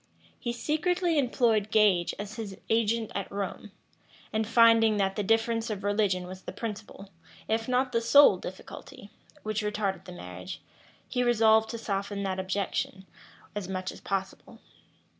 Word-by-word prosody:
He 240 - -2
secretly 330 +5 0
employed 235 -5 +2
Gage 205 -5 +3
as 205 0 -6
his 215 -4 -6
agent 225 0 +1
at 200 - -4
Rome, 200 +1 -5 0.6
and 220 0 0
finding 230 -1 +5
that 195 -1 0
the - - -1
difference 225 +2 +1
of 205 -3 -4
religion 205 -3 +1
was 185 +1 -9
the - - -7
principal, 210 -3 -7 0.4
if 225 +1 0
not 255 +1 +1
the 230 - +1
sole 235 -3 +7
difficulty, 190 +2 -10 0.3
which 215 0 -1
retarded 210 -2 -2
the 180 - -9
marriage, 90 - -8 0.5
he 250 - -1
resolved 220 -2 +4
to 230 - -4
soften 200 -1 -3
that 190 -1 -2
objection 190 0 -2 0.5
as 205 -3 -5
much 185 -1 -3
as - - -13
possible. 195 -1 -4
210 Hz, 150 wpm, -28 LUFS, 195-230 Hz, 0.6 s, sole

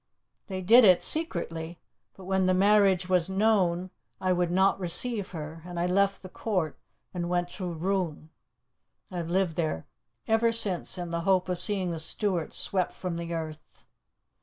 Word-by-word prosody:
They 190 -1 -4
did 230 +7 +7
it 185 -4 +6
secretly, 170 - -1 0.4
but 190 - -12
when 190 0 +1
the 185 - +3
marriage 195 -2 +4
was 180 -1 +2
known, 190 -3 +1 0.3
I 185 -1 +1
would 175 -1 0
not 190 +2 +2
receive 195 +4 -1
her, 160 -1 -7
and 175 -1 -6
I 175 - +1
left 195 +2 +1
the - - -7
court 185 -5 -3 0.3
and 175 -1 -3
went 175 0 0
to 180 -2 -5
Rouen. 170 -2 -3 0.8
I 180 - -5
have 170 -1 -4
lived 175 -2 0 0.7
ever 225 +1 +3
since 200 -5 +1
in 175 -1 -5
the 170 0 -2
hope 185 0 +1
of 180 -1 -2
seeing 190 -4 +3
the 165 - -4
Stuarts 175 +1 -2
swept 185 -2 -1
from 180 -2 -5
the 170 0 -5
earth. 155 -2 -7
180 Hz, 165 wpm, -27 LUFS, 170-195 Hz, 0.8 s, did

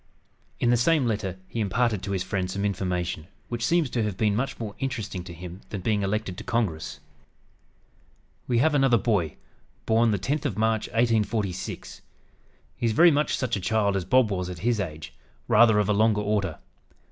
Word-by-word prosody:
In 120 - +3
the 120 - +4
same 145 +3 +3
letter 100 -5 -2
he 115 - -5
imparted 110 0 +1
to 100 - -5
his 95 -2 -1
friend 95 -1 -2
some 100 +2 -2
information 90 -4 -2 0.2
which 120 -1 -3
seems 170 +3 +2
to 120 - 0
have 105 -4 -2
been 105 -1 +2
much 125 +5 -2
more 110 -3 -5
interesting 115 -9 -3
to 90 - -8
him 90 +2 -9
than 100 - -5
being 105 +2 +1
elected 100 -2 -2
to - - -7
Congress: 100 -10 -2 1.5
"We 120 - +1
have 155 +6 +3
another 135 -4 +4
boy, 100 - 0 0.5
born 115 +1 +3
the 105 - +1
10th 135 - -2
of 95 - -2
March 110 0 +1
(1846). 110 -4 -1 0.8
He - - -2
is 110 - +1
very 170 +8 +7
much 150 +1 +1
such 125 -3 -1
a 100 - -4
child 100 0 +1
as 95 - 0
Bob 115 +3 +3
was 90 -2 -2
at 90 +3 -7
his 120 -2 +2
age, 80 -5 -5 0.3
rather 110 -1 +6
of 105 -2 +2
a 105 - +2
longer 105 0 +3
order. 100 -5 -1
105 Hz, 190 wpm, -26 LUFS, 95-120 Hz, 1.5 s, very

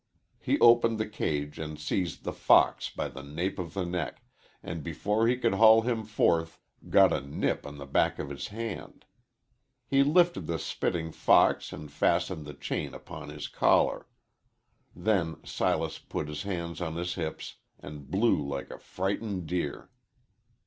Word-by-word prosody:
He - - 0
opened 115 -1 +6
the 110 - -1
cage 75 -8 -3
and 75 -1 -6
seized 85 +3 -2
the - - -3
fox - - +4
by - - -3
the 70 - -9
nape 80 +8 -3
of 85 0 -6
the 95 -2 -1
neck, 90 0 -4 0.4
and, 80 -1 -5
before 105 +8 0
he 125 +1 +2
could 115 -4 +1
haul 110 +2 +7
him 115 -2 -1
forth, 85 -6 +1 0.3
got - - +6
a - - 0
nip 70 +1 -2
on 70 0 -9
the 70 - -8
back 70 - +1
of 70 - -5
his 70 - -5
hand. 115 -1 -7 0.8
He 135 +3 +3
lifted 175 +5 +3
the 85 - -1
spitting 80 +1 -2
fox - - +3
and 75 -1 -9
fastened 75 +1 0
the 75 - -8
chain - - -4
upon - - -9
his - - -6
collar. - - +2 0.9
Then 90 -4 0
Silas - - -1
put - - -5
his 75 0 -5
hands 85 -3 -4
on 80 -2 -3
his 90 +1 -2
hips 80 -3 -5 0.2
and 70 -2 -10
blew 105 -3 +2
like 70 -1 -5
a - - -9
frightened 95 -1 -3
deer. 80 -3 -3
85 Hz, 165 wpm, -29 LUFS, 75-110 Hz, 0.9 s, haul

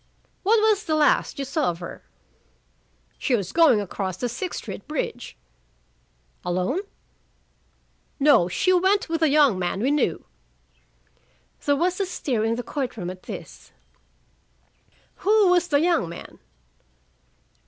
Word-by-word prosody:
"What 440 +3 +3
was 430 -2 +3
the 310 - 0
last 300 -1 +2
you 275 - -3
saw 280 +1 0
of 170 - -4
her?" 175 - -9 1.2
"She 255 - +1
was 195 -5 -3
going 320 -10 +5
across 190 -2 -4
the 245 - -2
Sixth 255 +10 -4
Street - - -8
bridge." 285 -5 -4 1.1
"Alone?" 185 - -1 1.4
"No. 280 -11 +5
She 365 - +1
went 380 +2 +2
with 330 0 -1
a 320 - +4
young 280 -9 +4
man 180 +1 -2
we 255 +6 +1
knew." 285 - 0 1.4
There 285 - +2
was 355 +5 0
a 395 - 0
stir 255 -10 -2
in 225 +1 +1
the 245 - -4
court 260 -4 -4
room 180 -3 -4
at 185 0 -11
this. - - -9 1.5
"Who 420 -1 +4
was 360 -1 +3
the 285 -3 +2
young 330 - +1
man?" 170 - -10
285 Hz, 140 wpm, -24 LUFS, -, 1.5 s, going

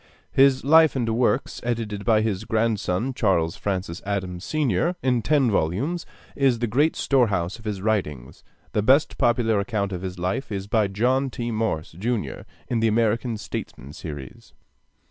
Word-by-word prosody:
His 135 -1 +4
'Life 160 +2 +6
and 120 -3 0
Works,' 120 +3 0
edited 115 -4 -3
by 110 -2 +4
his 105 -2 -1
grandson, 110 +1 0
Charles 90 -9 +1
Francis 95 -3 -3
Adams, 95 -3 -3
Sr., 150 - 0
in 125 -2 +2
ten 135 -1 +2
volumes, 105 - -1 0.3
is 135 -3 +3
the 120 - -1
great 140 +8 +2
storehouse 105 -8 +1
of 110 - -16
his 100 -3 -4
writings. 75 - -2 0.3
The 105 - +1
best 135 +8 +3
popular 115 -3 +2
account 100 -1 -2
of 90 -2 -4
his 95 0 -5
life 95 +10 -2
is 100 -1 -3
by 110 0 +2
John 125 +7 +1
T. 120 -1 -4
Morse, 110 -8 -2
Jr., 110 +7 -3 0.2
in 120 - 0
the 115 - +2
'American 115 +1 +1
Statesmen' 70 -8 -7
series. 75 -5 -9
110 Hz, 160 wpm, -24 LUFS, 95-125 Hz, 0.3 s, Life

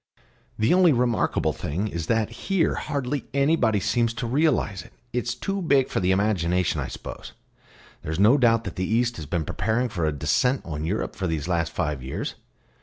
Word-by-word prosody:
"The 110 +8 +3
only 180 -2 +6
remarkable 120 -2 +1
thing 90 +9 -3
is 85 -4 -4
that 110 -2 +1 0.2
here 195 -4 +2
hardly 140 0 -3
anybody 140 -7 +3
seems 115 +3 0
to 125 - -3
realise 120 - +1
it. - - -16 0.2
It's 120 -1 -1
too 195 0 -3
big 140 -6 +3
for - - -1
the 90 -1 +1
imagination, 90 -3 +1
I - - -3
suppose. - - -8 0.7
There 75 - -5
is 80 - -2
no 110 +9 +5
doubt 115 -2 +4
that - - -7
the 95 - -1
East 120 +1 +1
has 80 -3 -7
been 80 +1 -1
preparing 115 - 0
for 85 -6 -2
a - - +1
descent 75 - +1
on 75 -2 -4
Europe 100 +7 -2
for 95 - -2
these 80 -2 -2
last 85 -2 0
five 75 -4 -2
years. 65 +2 -4
110 Hz, 190 wpm, -25 LUFS, 85-125 Hz, 0.7 s, only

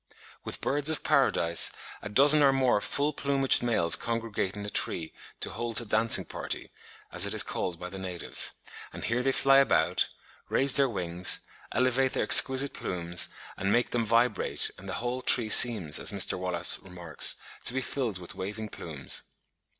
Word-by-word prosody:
With - - -9
birds 145 +2 -1
of 160 - -3
paradise 130 - +1 0.3
a 105 - -8
dozen 145 +7 +6
or 140 -1 +3
more 130 -6 0
full 145 +2 -3
plumaged 140 -1 0
males 110 -9 +1
congregate 115 -4 -5
in 105 0 -9
a - - -5
tree 80 -2 -2 0.3
to - - -4
hold 120 -1 -3
a 120 - -8
dancing 110 +2 +4
party, - - -8 0.4
as - - +3
it - - -4
is - - +6
called 85 -2 -6
by 90 - -8
the 95 +1 -11
natives: 90 -3 +1 0.4
and - - -11
here 120 +2 -3
they 135 +1 -1
fly 135 +1 +2
about, 140 - 0 0.4
raise 135 0 +1
their 140 -2 +2
wings, 90 -4 0 0.3
elevate 130 +1 -1
their - - -2
exquisite 135 +1 +6
plumes, 85 -1 -2 0.3
and 100 +1 -3
make 120 +2 -1
them 120 -1 -2
vibrate, 115 +1 +1
and 95 +1 -12
the - - -5
whole 125 +1 -5
tree 120 -3 +2
seems, 105 -10 +7
as - - +1
Mr. - - +2
Wallace 90 -1 0
remarks, 90 -4 -1 0.3
to - - +4
be 130 - -4
filled 125 -6 -5
with 90 -2 -11
waving 105 +3 -8
plumes. - - -3
115 Hz, 175 wpm, -26 LUFS, 95-130 Hz, 0.4 s, seems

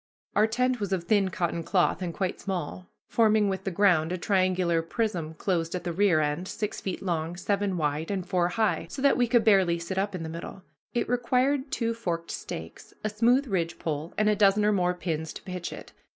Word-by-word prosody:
Our 215 +1 +5
tent 250 +2 0
was 200 -2 -3
of 180 -3 -1
thin 195 +1 +2
cotton 170 -2 -2
cloth 180 +1 +1
and 175 -2 -2
quite 185 +2 -3
small, 185 -1 -4 0.2
forming 215 -2 +3
with 190 0 -3
the - - +1
ground 175 -4 +3
a 180 - -1
triangular 185 -3 +2
prism 165 -3 -2
closed 165 -1 -1
at 180 - -4
the 175 -1 -3
rear 180 -3 +3
end, 150 +5 -1
six 210 0 -4
feet 190 0 -4
long, 170 -2 -2
seven 195 0 -1
wide, 150 0 -1
and 190 -3 -2
four 180 -2 +1
high, 215 +4 0
so - - -7
that 280 - +5
we 245 -1 +2
could 235 -1 +3
barely 190 -6 +4
sit 170 +3 -3
up 200 0 -1
in 170 - -4
the - - -4
middle. 170 +3 -7 0.3
It 240 - +1
required 255 +3 +1
two 230 -3 -1
forked 170 -7 -3
stakes, - - -7
a 215 - 0
smooth 240 +6 +3
ridgepole, 165 - -3
and 215 - +3
a 210 - +4
dozen 205 0 +4
or 210 - +4
more 180 -3 +1
pins 160 -3 -3
to - - -10
pitch 180 -2 -5
it. - - -10
185 Hz, 210 wpm, -27 LUFS, 170-210 Hz, 0.3 s, Our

